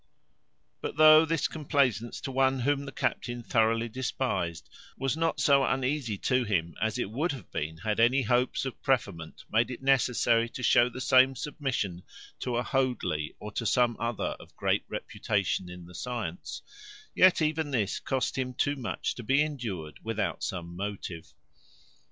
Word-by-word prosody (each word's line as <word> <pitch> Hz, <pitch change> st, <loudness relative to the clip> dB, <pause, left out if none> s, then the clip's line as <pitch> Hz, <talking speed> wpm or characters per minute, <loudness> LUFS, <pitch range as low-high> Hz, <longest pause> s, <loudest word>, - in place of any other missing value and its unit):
But -, -, -5 dB
though 155 Hz, +1 st, +8 dB
this 165 Hz, -2 st, 0 dB
complacence 135 Hz, -7 st, 0 dB
to 135 Hz, -, -4 dB
one 135 Hz, 0 st, +2 dB
whom 140 Hz, +2 st, +1 dB
the 135 Hz, -, -7 dB
captain 120 Hz, -2 st, -2 dB
thoroughly 115 Hz, 0 st, +2 dB
despised, 110 Hz, -, -2 dB, 0.3 s
was 135 Hz, +1 st, 0 dB
not 165 Hz, -3 st, 0 dB
so 140 Hz, 0 st, +5 dB
uneasy 130 Hz, -5 st, 0 dB
to 130 Hz, +5 st, +1 dB
him 85 Hz, -7 st, -1 dB
as 110 Hz, -1 st, 0 dB
it 100 Hz, -, -2 dB
would 155 Hz, +9 st, 0 dB
have 135 Hz, -, -10 dB
been 80 Hz, +2 st, -3 dB
had 105 Hz, +4 st, -2 dB
any 125 Hz, +4 st, +4 dB
hopes 125 Hz, +3 st, +1 dB
of 130 Hz, -, -6 dB
preferment 100 Hz, -11 st, -1 dB
made 115 Hz, +3 st, +3 dB
it 125 Hz, +1 st, -7 dB
necessary 120 Hz, -3 st, +3 dB
to 125 Hz, -, -7 dB
show 120 Hz, +1 st, +5 dB
the 125 Hz, -, -8 dB
same 130 Hz, +1 st, +5 dB
submission 130 Hz, -, -3 dB, 0.4 s
to 125 Hz, -2 st, -2 dB
a 120 Hz, -, 0 dB
Hoadley, 125 Hz, -, -1 dB
or 105 Hz, -, -7 dB
to 115 Hz, -, -3 dB
some 120 Hz, +1 st, +3 dB
other 115 Hz, -1 st, -2 dB
of -, -, -15 dB
great -, -, 0 dB
reputation 95 Hz, -2 st, -2 dB
in 90 Hz, -1 st, -9 dB
the 90 Hz, -, -14 dB
science, 125 Hz, -, -5 dB, 0.5 s
yet 185 Hz, 0 st, +6 dB
even 155 Hz, -1 st, 0 dB
this 110 Hz, -7 st, 0 dB
cost 130 Hz, -1 st, -1 dB
him 130 Hz, -1 st, -3 dB
too 145 Hz, +3 st, +1 dB
much 125 Hz, -5 st, -3 dB
to -, -, -8 dB
be 135 Hz, +6 st, +3 dB
endured 110 Hz, -, -5 dB
without 110 Hz, -1 st, -2 dB
some 85 Hz, -3 st, -4 dB
motive. 95 Hz, -4 st, -6 dB
125 Hz, 165 wpm, -29 LUFS, 105-135 Hz, 0.5 s, though